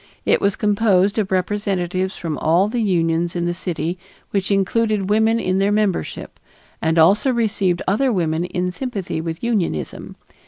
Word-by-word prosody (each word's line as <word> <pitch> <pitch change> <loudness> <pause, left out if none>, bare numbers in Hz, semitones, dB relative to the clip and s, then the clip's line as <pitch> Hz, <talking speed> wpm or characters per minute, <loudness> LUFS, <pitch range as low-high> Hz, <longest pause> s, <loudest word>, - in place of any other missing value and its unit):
It - - +3
was 200 0 +1
composed 205 -1 +2
of 200 -3 -1
representatives 185 -1 -1
from 160 -3 -3
all 170 +5 +3
the 235 +2 -2
unions 170 -4 0
in 175 -1 -1
the 175 - 0
city 175 -1 -4 0.3
which 195 -1 -1
included 205 0 +1
women 220 +2 +3
in 185 -3 0
their 200 +1 +2
membership 205 -3 -2 0.4
and 160 +1 +1
also 200 +11 +4
received 205 -7 0
other 250 +7 +2
women 170 -4 0
in 180 0 -2
sympathy 200 -7 -4
with 165 +3 -5
unionism. 195 - -2
190 Hz, 155 wpm, -20 LUFS, 175-210 Hz, 0.4 s, also